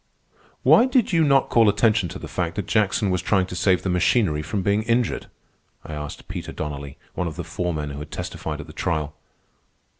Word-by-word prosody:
"Why 240 - +6
did 250 -6 +2
you 165 -1 +4
not 140 -2 +3
call 115 -3 +5
attention 105 -3 +2
to 90 - -7
the - - -8
fact 85 -2 -2
that 105 - -3
Jackson 105 -1 +1
was 90 -1 0
trying 95 0 +2
to 90 - -7
save 90 +1 +2
the 95 - -1
machinery 90 -3 +2
from 95 +5 -3
being 100 +2 +2
injured?" 115 +1 0 0.6
I 80 - -7
asked 75 -1 -7
Peter - - -6
Donnelly, 70 -1 -6 0.2
one 90 - -2
of 80 - -5
the 85 - -4
foremen 80 -3 -3
who 70 - -6
had 75 - -8
testified - - -5
at - - -7
the - - -12
trial. 75 -1 -2
90 Hz, 205 wpm, -23 LUFS, 80-110 Hz, 0.6 s, Why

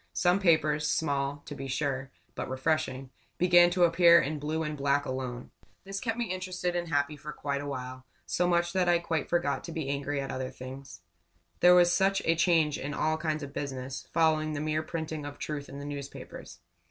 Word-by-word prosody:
Some 180 +2 +3
papers 155 -5 +3
small, 145 -2 -1
to - - -7
be 135 -1 -6
sure, 135 0 -2 0.2
but - - -5
refreshing 130 -1 -1 0.3
began 175 -1 +6
to 175 0 +2
appear 170 0 +7
in 150 +2 -2
blue 155 +2 -2
and 150 -1 -3
black 140 0 +1
alone. 130 -2 -5 0.3
This 195 +1 -5
kept 225 -2 -2
me 240 - 0
interested 185 -1 -3
and 175 0 -1
happy 145 -1 0
for 150 +1 -8
quite 140 -1 -3
a 145 - -6
while; 130 -2 -6 0.2
so 180 - +1
much 175 0 +2
so 190 - 0
that 180 -1 +3
I 175 - +5
quite 165 -3 -2
forgot 145 -6 0
to - - -7
be 160 -4 -4
angry 140 0 -2
at 135 0 -4
other 130 0 -3
things. 130 -3 -10 0.6
There 180 0 +7
was 175 0 +5
such 195 +2 +3
a 165 - +4
change 165 -3 +2
in 145 +2 -4
all 155 0 +1
kinds 155 -1 -2
of 140 0 -8
business, 135 -2 -5
following 155 -1 +2
the 145 - -3
mere 155 +1 0
printing 160 -1 -5
of 145 0 -7
truth 145 -2 -5
in 140 - -8
the 140 - -7
newspapers. 140 -10 -8
150 Hz, 205 wpm, -29 LUFS, 140-170 Hz, 0.6 s, appear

